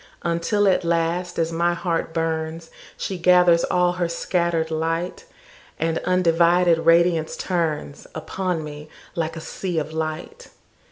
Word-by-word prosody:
Until 170 Hz, +5 st, +1 dB
at 185 Hz, -1 st, +3 dB
last, 170 Hz, +1 st, -1 dB
as 165 Hz, 0 st, 0 dB
my 170 Hz, +1 st, +1 dB
heart 170 Hz, -2 st, -2 dB
burns, 165 Hz, 0 st, -3 dB, 0.3 s
She 190 Hz, -2 st, -4 dB
gathers 180 Hz, -1 st, +5 dB
all 180 Hz, -1 st, +2 dB
her 175 Hz, -1 st, -2 dB
scatter'd 170 Hz, -1 st, -1 dB
light, 165 Hz, +2 st, -2 dB, 0.5 s
And 165 Hz, +1 st, 0 dB
undivided 175 Hz, -1 st, +3 dB
radiance 165 Hz, -1 st, +3 dB
turnsUpon 170 Hz, -, -3 dB
me 150 Hz, 0 st, -9 dB, 0.2 s
like 165 Hz, -1 st, -2 dB
a 165 Hz, -, -6 dB
sea 180 Hz, +1 st, -4 dB
of 155 Hz, 0 st, -2 dB
light. 160 Hz, -, -5 dB
170 Hz, 125 wpm, -23 LUFS, 160-180 Hz, 0.5 s, gathers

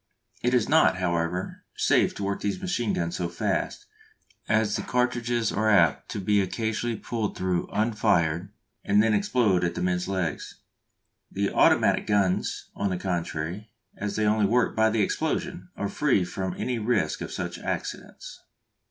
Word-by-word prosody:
It 125 Hz, +1 st, +2 dB
is 120 Hz, -4 st, +2 dB
not, 160 Hz, -10 st, +4 dB
however, 90 Hz, 0 st, -2 dB
safe -, -, +2 dB
to 100 Hz, -, -5 dB
work 100 Hz, 0 st, -2 dB
these 105 Hz, -, -2 dB
machine 175 Hz, -, -1 dB
guns 85 Hz, 0 st, -2 dB
so 90 Hz, -2 st, -2 dB
fast, 85 Hz, -, -2 dB, 0.6 s
as 110 Hz, -1 st, +2 dB
the 105 Hz, -, -1 dB
cartridges 120 Hz, -1 st, 0 dB
are 110 Hz, +2 st, +1 dB
apt 90 Hz, -8 st, +3 dB
to -, -, -4 dB
be 100 Hz, +1 st, +2 dB
occasionally 110 Hz, +4 st, -2 dB
pulled 110 Hz, -1 st, -3 dB
through 90 Hz, -2 st, -1 dB
unfired 95 Hz, -5 st, +1 dB, 0.3 s
and 105 Hz, +1 st, +4 dB
then 110 Hz, -1 st, +2 dB
explode 105 Hz, -3 st, +2 dB
among 85 Hz, -1 st, 0 dB
the -, -, -3 dB
men's 90 Hz, 0 st, 0 dB
legs. 90 Hz, -6 st, -3 dB, 0.8 s
The 100 Hz, 0 st, -1 dB
automatic -, -, +4 dB
guns, 100 Hz, -3 st, 0 dB
on 100 Hz, -, -1 dB
the 90 Hz, -, -1 dB
contrary, 90 Hz, +2 st, -3 dB, 0.3 s
as 105 Hz, 0 st, -4 dB
they 110 Hz, -, +1 dB
only 105 Hz, -1 st, +3 dB
work 120 Hz, +3 st, +2 dB
by 110 Hz, 0 st, +4 dB
the 110 Hz, -1 st, +1 dB
explosion, 90 Hz, -1 st, -2 dB
are 100 Hz, -, -1 dB
free 115 Hz, -5 st, +1 dB
from 95 Hz, 0 st, -4 dB
any 125 Hz, -2 st, -2 dB
risk 110 Hz, -1 st, 0 dB
of -, -, -5 dB
such -, -, -4 dB
accidents. -, -, -6 dB
100 Hz, 160 wpm, -26 LUFS, 90-110 Hz, 0.8 s, not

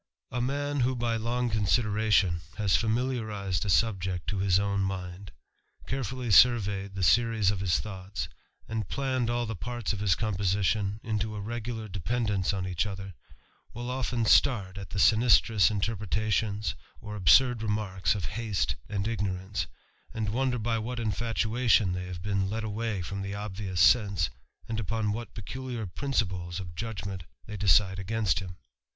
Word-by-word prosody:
* -, -, -53 dB
A 125 Hz, -, -1 dB
man 145 Hz, +3 st, -1 dB
who 130 Hz, +1 st, +2 dB
by 120 Hz, -1 st, 0 dB
long 120 Hz, +2 st, -1 dB
consideration 105 Hz, -4 st, +2 dB, 0.2 s
has 100 Hz, -5 st, +2 dB
familiarised 110 Hz, -5 st, -1 dB
a -, -, -2 dB
subject 95 Hz, -4 st, +1 dB
to 100 Hz, -, -2 dB
his 95 Hz, -2 st, +3 dB
own 100 Hz, 0 st, 0 dB
mind, 95 Hz, 0 st, -4 dB, 0.5 s
carefully 125 Hz, -2 st, -3 dB
surveyed 100 Hz, -4 st, +4 dB
the 95 Hz, -, -2 dB
series 110 Hz, +2 st, +4 dB
of 100 Hz, -, -3 dB
his 90 Hz, -4 st, +1 dB
thoughts, 95 Hz, -2 st, -5 dB, 0.4 s
and 110 Hz, -3 st, -3 dB
planned 130 Hz, -3 st, -1 dB
all 120 Hz, 0 st, 0 dB
the 110 Hz, 0 st, -4 dB
parts 120 Hz, +3 st, -3 dB
of 105 Hz, -, -4 dB
his 100 Hz, -4 st, +2 dB
composition 100 Hz, 0 st, 0 dB
into 110 Hz, -1 st, -2 dB
a -, -, -4 dB
regular 110 Hz, +1 st, -4 dB
dependence 100 Hz, +1 st, -1 dB
on 95 Hz, -2 st, -2 dB
each 90 Hz, +1 st, -1 dB
other, 95 Hz, -1 st, -6 dB, 0.6 s
will 120 Hz, +2 st, -4 dB
often 125 Hz, -2 st, -1 dB
start 100 Hz, -6 st, +4 dB
at 100 Hz, -, -8 dB
the -, -, -6 dB
sinistrous 110 Hz, -1 st, +5 dB
^terpretations 105 Hz, 0 st, -1 dB, 0.3 s
or 105 Hz, -1 st, -7 dB
absurd 110 Hz, -, +5 dB
remarks 105 Hz, -3 st, 0 dB
of 95 Hz, -4 st, -3 dB
haste 105 Hz, -1 st, -1 dB
and 100 Hz, 0 st, -2 dB
ignorance, 100 Hz, -3 st, -2 dB, 0.5 s
^d 110 Hz, -2 st, -1 dB
wonder 125 Hz, +3 st, 0 dB
by 115 Hz, 0 st, 0 dB
what 120 Hz, +2 st, -4 dB
infatuation 115 Hz, -2 st, +1 dB
they 90 Hz, 0 st, -4 dB
have 90 Hz, -1 st, -7 dB
been 100 Hz, -1 st, 0 dB
led 110 Hz, +2 st, -3 dB
away 110 Hz, -2 st, -2 dB
from 100 Hz, +3 st, -5 dB
the 100 Hz, 0 st, -4 dB
obvious 100 Hz, -2 st, -4 dB
sense, 100 Hz, -, +4 dB, 0.4 s
and 110 Hz, -1 st, -2 dB
upon 110 Hz, 0 st, -1 dB
what 115 Hz, +3 st, -5 dB
peculiar 125 Hz, +1 st, -5 dB
principles 95 Hz, -6 st, -2 dB
of 90 Hz, -3 st, -7 dB
judgment 100 Hz, -4 st, -5 dB, 0.2 s
they 105 Hz, -, -7 dB
decide 95 Hz, 0 st, +3 dB
against 100 Hz, -3 st, 0 dB
him. 90 Hz, -2 st, -8 dB
105 Hz, 155 wpm, -28 LUFS, 95-115 Hz, 0.6 s, sinistrous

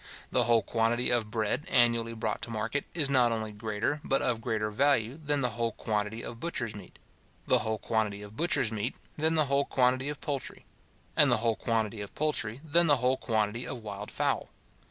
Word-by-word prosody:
The 125 Hz, -2 st, +3 dB
whole 115 Hz, -2 st, +4 dB
quantity 115 Hz, +2 st, +1 dB
of 115 Hz, -3 st, +1 dB
bread 110 Hz, +6 st, -1 dB
annually 115 Hz, -1 st, +3 dB
brought 110 Hz, -1 st, -3 dB
to -, -, -5 dB
market, 115 Hz, +5 st, -2 dB
is 155 Hz, -5 st, +3 dB
not 125 Hz, -4 st, +4 dB
only 110 Hz, -1 st, -2 dB
greater, 110 Hz, +7 st, -2 dB
but 135 Hz, -, +1 dB
of 120 Hz, -2 st, 0 dB
greater 110 Hz, -2 st, -1 dB
value, 130 Hz, 0 st, +2 dB
than 145 Hz, -2 st, -1 dB
the 125 Hz, -2 st, +1 dB
whole 115 Hz, 0 st, -1 dB
quantity 105 Hz, +1 st, -2 dB
of 115 Hz, 0 st, -7 dB
butcher's 120 Hz, -8 st, -3 dB
meat; 100 Hz, -, -11 dB, 0.5 s
the -, -, +4 dB
whole 110 Hz, 0 st, -1 dB
quantity 105 Hz, -2 st, -1 dB
of 105 Hz, +1 st, -11 dB
butcher's 145 Hz, -7 st, +1 dB
meat, 110 Hz, +3 st, -3 dB, 0.2 s
than 160 Hz, +2 st, +1 dB
the 155 Hz, -1 st, +4 dB
whole 140 Hz, 0 st, +1 dB
quantity 130 Hz, +2 st, +2 dB
of 150 Hz, -, -5 dB
poultry; 140 Hz, -4 st, -5 dB, 0.5 s
and 145 Hz, -3 st, +6 dB
the 120 Hz, -, +5 dB
whole 115 Hz, 0 st, +1 dB
quantity 110 Hz, -2 st, -1 dB
of 100 Hz, -, -8 dB
poultry, 130 Hz, -6 st, -1 dB
than 170 Hz, +3 st, +4 dB
the 145 Hz, -2 st, +5 dB
whole 125 Hz, +1 st, +2 dB
quantity 110 Hz, 0 st, -1 dB
of 120 Hz, -, -6 dB
wild 105 Hz, -1 st, -6 dB
fowl. -, -, -1 dB
115 Hz, 195 wpm, -29 LUFS, 110-135 Hz, 0.5 s, and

